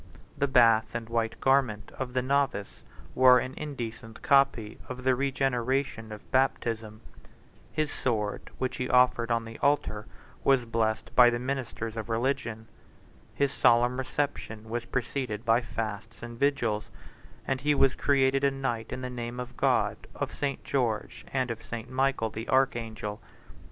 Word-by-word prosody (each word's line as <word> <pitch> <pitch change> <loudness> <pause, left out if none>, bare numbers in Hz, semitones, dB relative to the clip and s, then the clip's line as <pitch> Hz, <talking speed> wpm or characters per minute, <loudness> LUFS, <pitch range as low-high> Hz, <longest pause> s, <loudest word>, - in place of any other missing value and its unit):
The 140 - +1
bath 115 -4 +4
and 115 -1 -3
white 115 -1 -1
garment 130 -6 +2
of 130 -2 -4
the 125 -1 +1
novice 135 -6 0 0.3
were 130 -1 +7
an 130 +1 -2
indecent 115 -6 -7
copy 135 -7 +3
of 130 0 -6
the 130 0 +4
regeneration 130 -3 -1
of 105 -1 -10
baptism: 115 -4 0 0.7
his 155 -1 -1
sword, 105 -5 -2
which 130 - -2
he 125 - -2
offered 125 -2 +4
on 115 -1 +1
the 115 0 -9
altar, 125 -7 +1 0.4
was 135 -3 +4
blessed 110 -1 -1
by 125 -1 +8
the 120 - -1
ministers 125 -3 -4
of 110 0 -5
religion: 115 -2 -1 0.7
his 140 -1 +1
solemn 120 +1 +4
reception 130 -5 -3
was 120 0 -2
preceded 125 -3 -3
by 115 +1 +4
fasts 110 -1 -5
and 120 0 -8
vigils; 120 -7 +1 0.6
and 135 -1 -1
he 150 +1 +2
was 135 -1 +4
created 135 -1 +2
a 140 - +5
knight 130 -5 -3
in 130 - -4
the 130 - -4
name 120 0 -5
of 125 0 -6
God, - - +1
of - - -3
St. 140 -2 -3
George, 120 -6 -2
and 130 -2 0
of 115 - -6
St. 120 +1 -7
Michael 130 -4 +1
the 110 +2 -6
archangel. 115 -5 0
120 Hz, 155 wpm, -28 LUFS, 115-135 Hz, 0.7 s, by